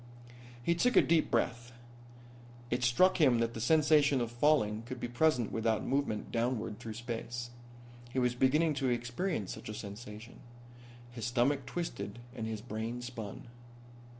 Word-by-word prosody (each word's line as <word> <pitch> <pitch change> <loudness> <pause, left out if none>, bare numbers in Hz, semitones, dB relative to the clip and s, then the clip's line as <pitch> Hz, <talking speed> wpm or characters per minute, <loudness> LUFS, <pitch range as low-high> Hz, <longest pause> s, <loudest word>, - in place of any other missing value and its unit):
He 170 - +3
took 245 +9 +2
a - - +9
deep 165 -1 +2
breath. 120 +1 -1 1.0
It 125 +1 0
struck 170 +10 +4
him 130 -5 +5
that 115 0 0
the 110 - -5
sensation 150 0 +4
of 120 -1 -2
falling 120 -5 +2
could 130 -1 -6
be 120 - -3
present 120 -2 +2
without 110 -1 0
movement 135 -6 -1
downward 115 -2 -1
through 110 -1 -7
space. 120 0 -5 0.6
He 130 - -6
was 125 -1 +2
beginning 150 +6 +3
to 130 - +2
experience 120 - -2
such - - -9
a 110 - -5
sensation. 105 +2 -9 0.7
His 115 -3 -5
stomach 130 +3 +1
twisted 110 - -4 0.2
and 110 -3 -4
his 110 -1 -4
brain 115 +1 -4
spun. 115 -5 -7
120 Hz, 150 wpm, -32 LUFS, 115-140 Hz, 1.0 s, a